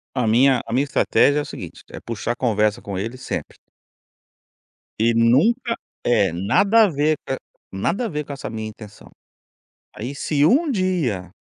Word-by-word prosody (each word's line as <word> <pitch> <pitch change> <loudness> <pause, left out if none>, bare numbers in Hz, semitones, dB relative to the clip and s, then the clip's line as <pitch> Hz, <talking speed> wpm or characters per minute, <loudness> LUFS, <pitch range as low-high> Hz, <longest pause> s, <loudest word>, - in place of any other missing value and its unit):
A 125 -3 +1
minha 125 +3 +4
a 115 - -6
minha 135 +3 +3
estratégia 145 0 +3
é - - 0
o - - -6
seguinte, - - -9
é - - -7
puxar 115 +1 -4
conversa 105 -4 +1
com 100 -2 -5
ele 115 +6 -4
sempre. 130 - -6 1.4
E 115 +2 +2
nunca 160 - +3 0.3
é, 105 -7 +3
nada 195 - +3
a - - 0
ver 155 0 +1
co 135 - -1 0.4
nada 170 - -1
a - - -2
ver 150 -2 -3
com 140 - -7
essa 135 - -6
minha 110 -1 -5
intenção. 105 - -13 0.9
Aí, 120 +6 -5
se 145 +1 +1
um 290 - +3
dia 150 - -1
125 Hz, 170 wpm, -21 LUFS, 110-155 Hz, 1.4 s, minha